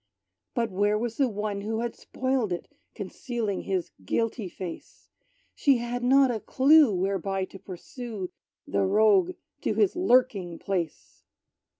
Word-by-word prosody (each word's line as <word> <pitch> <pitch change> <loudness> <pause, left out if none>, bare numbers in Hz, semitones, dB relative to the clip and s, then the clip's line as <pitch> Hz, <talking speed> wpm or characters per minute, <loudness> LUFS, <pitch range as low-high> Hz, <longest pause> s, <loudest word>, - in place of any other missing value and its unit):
But, 230 -3 0
where 205 +3 +2
was 230 +1 -3
the 270 -3 +3
one 210 -1 -3
who 220 +2 -2
had 235 -1 -3
spoiled 260 -5 -1
it 175 - -3 0.3
Concealing 230 -7 -3
his 185 -3 -2
guilty 225 - -1
face? 175 -1 -9 0.4
She 275 -3 +3
had 240 +1 -3
not 265 +1 +5
a 225 - -2
clue, 280 +3 +5
whereby 195 0 -1
to 195 - -13
pursue 200 +1 -7 0.4
The - - 0
rogue 195 -2 +4 0.3
to - - -1
his 400 -4 +3
lurking 245 - +2
place! 175 -5 -4
215 Hz, 135 wpm, -27 LUFS, 190-245 Hz, 0.4 s, not